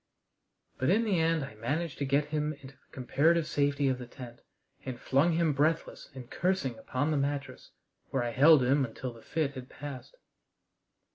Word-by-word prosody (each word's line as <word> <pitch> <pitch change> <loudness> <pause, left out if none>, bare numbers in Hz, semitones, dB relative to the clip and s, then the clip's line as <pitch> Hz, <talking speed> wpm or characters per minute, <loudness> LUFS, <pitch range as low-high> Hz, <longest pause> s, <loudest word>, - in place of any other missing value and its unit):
But 130 - +1
in 215 +5 +4
the 200 -6 +1
end 160 -2 +1
I 135 - -11
managed 145 +9 -3
to 140 - 0
get 140 +2 +1
him 150 0 0
into 140 -2 -13
the 130 - -35
comparative 155 +6 +2
safety 145 -1 +1
of 130 -1 0
the 125 - -8
tent, 120 -2 -11 0.4
and 125 -2 -6
flung 140 +6 +2
him 165 -2 +2
breathless 155 +4 -1
and 125 -2 -8
cursing 170 -6 -1
upon 145 +7 -1
the 150 - +1
mattress, 140 0 -3 0.4
where 130 -2 0
I 120 - -2
held 145 +3 +6
him 135 +3 +3
until 125 0 -5
the 115 - -15
fit 155 0 -2
had 130 -1 -9
passed. 145 - -9
140 Hz, 185 wpm, -30 LUFS, 130-160 Hz, 0.4 s, held